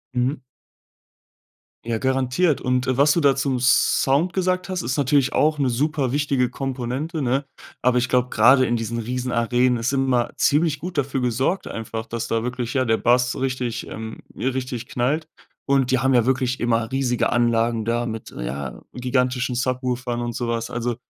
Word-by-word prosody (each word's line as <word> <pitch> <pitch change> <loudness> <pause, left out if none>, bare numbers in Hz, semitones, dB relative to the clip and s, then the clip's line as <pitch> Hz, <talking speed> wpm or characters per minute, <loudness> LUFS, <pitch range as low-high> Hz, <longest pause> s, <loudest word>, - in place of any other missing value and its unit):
Mhm. 125 +4 0 1.5
Ja, 115 -1 -1
garantiert. 130 +5 +1
Und, 125 0 0
äh, 130 - 0
was 145 +2 +5
du 170 - +2
da 140 -2 +4
zum 135 -1 0
Sound 135 +6 +3
gesagt 185 0 0
hast, 185 -2 -2
ist 125 +4 -2
natürlich 140 -1 +2
auch 150 0 +2
'ne 135 -2 +2
superwichtige 140 0 0
Komponente, 135 +5 -3
ne? 135 +2 0 0.4
Aber 125 0 +3
ich 125 - -1
glaube, 125 0 +2
grade 130 +4 +5
in 120 - 0
diesen 115 0 -3
Riesenarenen 125 +1 0
ist 115 +4 -1
immer 130 -3 +1
ziemlich 150 0 +2
gut 180 +1 -6
dafür 135 -1 0
gesorgt 125 +9 0
einfach, 115 0 -5
dass 115 0 -4
da 115 0 0
wirklich, 125 0 -3
ja, 130 -1 +1
der 110 -2 +2
Bass 125 +1 +2
richtig 130 -3 -2
ähm, 110 0 -7 0.2
richtig 130 -2 -3
knallt. 145 +6 -1 0.4
Und 135 -2 +2
die 130 - +3
haben 135 0 +2
ja 120 -2 +4
wirklich 130 -1 0
immer 115 -1 0
riesige 130 -2 0
Anlagen 115 -1 +1
da 120 +1 0
mit, 110 -1 -6
ja, 65 +1 -5
gigantischen 125 0 0
Subwoofern 125 -1 -2
und 120 0 -3
so 120 0 -3
was. 115 0 -2
Also, 120 0 -2
125 Hz, 170 wpm, -22 LUFS, 120-135 Hz, 1.5 s, was